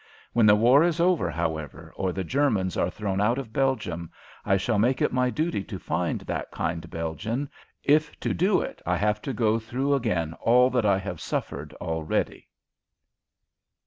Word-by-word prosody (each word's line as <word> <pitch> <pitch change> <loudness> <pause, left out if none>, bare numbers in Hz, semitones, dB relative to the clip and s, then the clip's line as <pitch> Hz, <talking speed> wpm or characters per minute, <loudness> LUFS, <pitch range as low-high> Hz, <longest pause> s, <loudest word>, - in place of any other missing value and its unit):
When 115 -2 +5
the 105 - +8
war 120 +7 +5
is 170 -1 +1
over, 175 - +2
however, 80 -2 -4
or 95 -1 -1
the 95 +1 -3
Germans 110 - +1
are 85 - +1
thrown 100 0 -2
out 115 +4 +2
of 120 -5 -6
Belgium, 105 - -1 0.3
I 95 - +2
shall 105 +2 0
make 125 +5 +2
it - - +1
my 125 0 +2
duty 155 - -1
to 100 - -6
find 85 -1 -2
that - - -4
kind 85 0 -3
Belgian, 105 - -3 0.4
if 150 +1 +2
to - - 0
do 185 +3 +2
it - - -6
I 90 0 0
have 105 +3 0
to 135 - -3
go 115 -3 +1
through 125 +5 -1
again 90 - 0
all 125 +2 +5
that 120 -4 +2
I 100 -2 +4
have 95 -4 -5
suffered 75 +2 -4
already. 80 -2 -2
105 Hz, 175 wpm, -26 LUFS, 90-130 Hz, 0.4 s, the